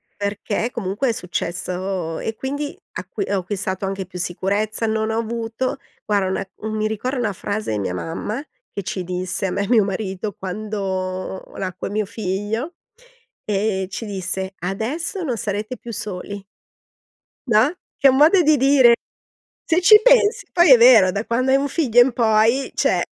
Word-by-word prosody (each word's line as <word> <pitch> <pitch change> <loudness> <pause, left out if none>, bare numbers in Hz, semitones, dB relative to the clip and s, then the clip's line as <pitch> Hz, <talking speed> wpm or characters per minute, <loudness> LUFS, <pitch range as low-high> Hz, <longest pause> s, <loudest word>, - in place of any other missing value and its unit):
perché, 205 +3 -2
comunque 220 +4 -2
è - - +3
successo 180 -2 -3
e 225 - -4
quindi 285 +2 -4 0.2
acqui 400 - -4
ho 200 - +1
acquistato 190 0 -3
anche 195 0 -3
più 180 0 -10
sicurezza, 200 +5 -1
non 220 0 0
ho 220 - -1
avuto 230 +3 -3 0.3
guarda, 200 -3 +1
una 190 0 -3
u 220 - -6
mi 215 0 0
ricorda 250 +5 -3
una 220 -5 -1
frase 205 - -3
di 105 - -1
mia 95 -2 -2
mamma, 165 - -4 0.3
che 200 - -3
ci 185 +1 -4
disse 185 +1 -2
a - - -3
me 200 - -1
e - - -4
mio 225 -4 +5
marito 195 0 -3
quando 190 -2 -4
nacque 185 -1 -4
mio 210 +1 -1
figlio, 220 - -3 0.7
ehm, 200 -2 0
ci 205 +4 -5
disse: 190 -1 -3
"Adesso 260 - -3
non 260 -7 -1
sarete 215 +4 -3
più 235 - -9
soli." 200 -1 -6 1.0
No? 220 +2 +5 0.3
Che 280 - +5
è - - +8
un 260 - +3
modo 325 +6 +6
di 310 -2 +4
dire. 265 -3 +6 0.8
Se 335 +2 +3
ci 425 +4 +8
pensi, - - +4
poi 345 -5 +6
è 250 - +9
vero 230 -6 +7
da 200 +4 -3
quando 255 +3 0
hai 265 - +6
un 280 +1 0
figlio 250 -8 +3
in 245 +1 +5
poi, 230 +3 +2
cioè - - +2
215 Hz, 170 wpm, -21 LUFS, 190-245 Hz, 1.0 s, è